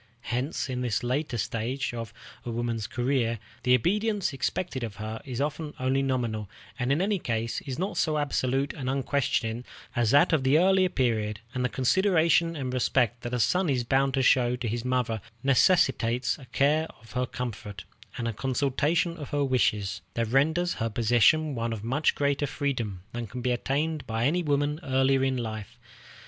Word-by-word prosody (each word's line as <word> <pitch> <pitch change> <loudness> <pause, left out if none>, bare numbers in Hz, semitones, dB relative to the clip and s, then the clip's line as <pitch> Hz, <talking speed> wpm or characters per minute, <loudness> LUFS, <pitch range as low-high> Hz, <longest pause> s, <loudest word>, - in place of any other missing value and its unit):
Hence, 130 +6 -1
in 125 -1 -3
this 120 -2 -1
latter 130 +1 -1
stage 115 +5 -2
of 115 -1 -5 0.3
a - - -5
woman's 115 -2 -2
career, 120 -2 0 0.2
the 125 0 +5
obedience 205 - 0
expected 135 0 -2
of 110 -4 -5
her 110 +2 -5
is 130 -3 -5
often 150 +1 -3
only 130 +1 +1
nominal, 120 -6 -1 0.3
and 125 +2 0
in 155 +6 +2
any 200 -1 +1
case 115 -4 -2
is 130 - -3
not 190 +5 -2
so 155 -2 +1
absolute 140 -1 0
and 130 -3 -4
unquestioning 125 -4 0 0.3
as 120 -2 +2
that 145 +7 +5
of 150 -4 +2
the 135 +3 +4
early 185 +1 +4
period; 110 - 0
and 130 -1 -1
the 125 - +1
consideration 165 - +3
and 130 -4 -3
respect 125 -1 +1
that 120 - -5
a - - -1
son 180 - +2
is 125 -3 +1
bound 135 +2 +2
to 135 - +1
show 125 -1 +4
to 125 -1 -4
his 115 +2 -2
mother 125 -4 0 0.2
necessitates 130 -4 +3
a 135 - -12
care 150 +5 +2
of 115 -1 -17
her 125 +2 -1
comfort, 110 -7 -6 0.3
and 115 - -2
a 115 - -2
consultation 140 - 0
of 145 -3 -7
her 145 -1 0
wishes, 105 -6 +1
that 115 -1 0
renders 160 +7 +2
her 115 - +1
position 120 +8 +3
one 115 -2 -2
of 110 -2 -5
much 135 +6 +1
greater 145 0 +1
freedom 120 -10 -3
than 120 -1 -4
can 125 +4 -6
be 125 0 0
obtained 145 +5 -1
by 115 +1 0
any 170 +6 +2
woman 145 -1 0
earlier 135 -2 +2
in 135 -1 +1
life. 110 -4 -5
130 Hz, 185 wpm, -27 LUFS, 115-145 Hz, 0.3 s, the